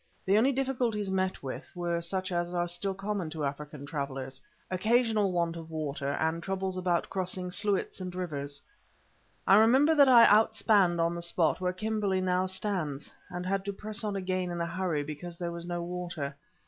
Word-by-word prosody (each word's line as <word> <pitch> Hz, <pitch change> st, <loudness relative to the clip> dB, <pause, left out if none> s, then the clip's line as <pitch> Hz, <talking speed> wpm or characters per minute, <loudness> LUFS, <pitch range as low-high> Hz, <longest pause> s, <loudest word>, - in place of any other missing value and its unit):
The 195 Hz, -, +3 dB
only 240 Hz, +6 st, +5 dB
difficulties 245 Hz, -7 st, -1 dB
met 190 Hz, -3 st, -1 dB
with 130 Hz, +1 st, -6 dB
were 170 Hz, -1 st, -1 dB
such 185 Hz, +2 st, -2 dB
as 175 Hz, 0 st, -1 dB
are 175 Hz, 0 st, +1 dB
still 185 Hz, +3 st, -2 dB
common 195 Hz, -3 st, -3 dB
to 155 Hz, -2 st, -3 dB
African 145 Hz, 0 st, -5 dB
travellers—occasional 180 Hz, -, -1 dB
want 170 Hz, -1 st, 0 dB
of 165 Hz, -1 st, -8 dB
water 145 Hz, -3 st, -3 dB
and 160 Hz, +2 st, 0 dB
troubles 190 Hz, +1 st, -2 dB
about 180 Hz, -2 st, 0 dB
crossing 185 Hz, -1 st, -3 dB
sluits 200 Hz, 0 st, 0 dB
and 180 Hz, -1 st, -5 dB
rivers. 145 Hz, -6 st, -4 dB, 0.8 s
I 195 Hz, -, +7 dB
remember 260 Hz, +8 st, +6 dB
that 285 Hz, -3 st, +6 dB
I 240 Hz, -2 st, +9 dB
outspanned 210 Hz, -4 st, +4 dB
on 165 Hz, 0 st, +2 dB
the 170 Hz, -, -4 dB
spot 170 Hz, 0 st, +1 dB
where 180 Hz, 0 st, +1 dB
Kimberley 205 Hz, 0 st, -1 dB
now 185 Hz, 0 st, +1 dB
stands, 185 Hz, -7 st, -3 dB, 0.2 s
and 180 Hz, 0 st, -5 dB
had 195 Hz, +1 st, 0 dB
to 200 Hz, -, -2 dB
press 210 Hz, +2 st, -5 dB
on 210 Hz, -2 st, -2 dB
again 185 Hz, -1 st, -1 dB
in 175 Hz, 0 st, -4 dB
a 170 Hz, -, 0 dB
hurry 170 Hz, -3 st, -1 dB
because 155 Hz, +4 st, -7 dB
there 175 Hz, -1 st, -3 dB
was 170 Hz, 0 st, -7 dB
no 175 Hz, -1 st, -2 dB
water. 170 Hz, -5 st, -4 dB
180 Hz, 180 wpm, -30 LUFS, 170-200 Hz, 0.8 s, I